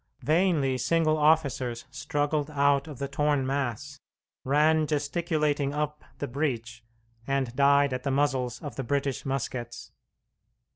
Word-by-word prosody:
Vainly 155 -5 +2
single 155 +3 +2
officers 145 -6 +1
struggled 145 0 -1
out 140 -1 +2
of 150 -4 -8
the 140 - -3
torn 145 -1 +1
mass, 140 +1 -3 0.4
ran 155 +3 +3
gesticulating 150 -1 0
up 150 0 -3
the 145 - -3
breach, 120 -4 -3 0.4
and 135 -3 -1
died 140 0 +4
at 125 - -3
the 140 - -2
muzzles 135 -3 0
of 145 - -7
the 135 - -2
British 140 +1 -2
muskets. 125 -3 -4
140 Hz, 130 wpm, -27 LUFS, 135-150 Hz, 0.4 s, died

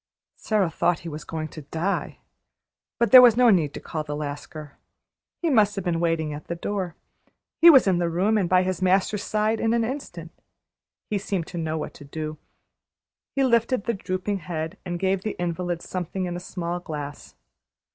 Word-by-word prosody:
Sara 205 -6 0
thought 175 0 +1
he 170 - -6
was 150 0 -7
going 160 -1 -4
to 155 - -9
die. 165 +7 -3 0.8
But 235 - +1
there 255 -1 +12
was 240 -2 +6
no 245 -2 +6
need 160 -7 +2
to - - -5
call 155 -1 -4
the 150 -1 -5
Lascar. 145 0 -7 0.6
He - - +2
must 210 -5 +4
have 195 -2 -4
been 170 -2 0
waiting 165 -3 0
at 145 0 -8
the 170 - -3
door. 185 -1 -3 0.7
He 340 - +10
was 275 -6 +8
in 185 -3 +2
the 170 -1 0
room 190 +6 +1
and 190 -5 +1
by 185 0 +4
his 185 -1 -2
master's 190 +2 +2
side 215 +1 0
in 225 +1 +1
an 235 - +2
instant. 200 - -6 0.8
He 205 - +1
seemed 195 -4 -2
to 175 - -7
know 160 -1 -2
what 155 - -5
to - - -13
do. 155 +1 -6 1.0
He 275 - +2
lifted 235 -2 +2
the 235 - -1
drooping 190 0 -3
head, 160 +1 -4
and 175 -2 -4
gave 190 0 +1
the 215 - -3
invalid 175 0 -2
something 185 +1 -4
in 175 -1 -4
a - - -4
small 175 -1 -4
glass. 150 -4 -7
180 Hz, 195 wpm, -25 LUFS, 160-205 Hz, 1.0 s, there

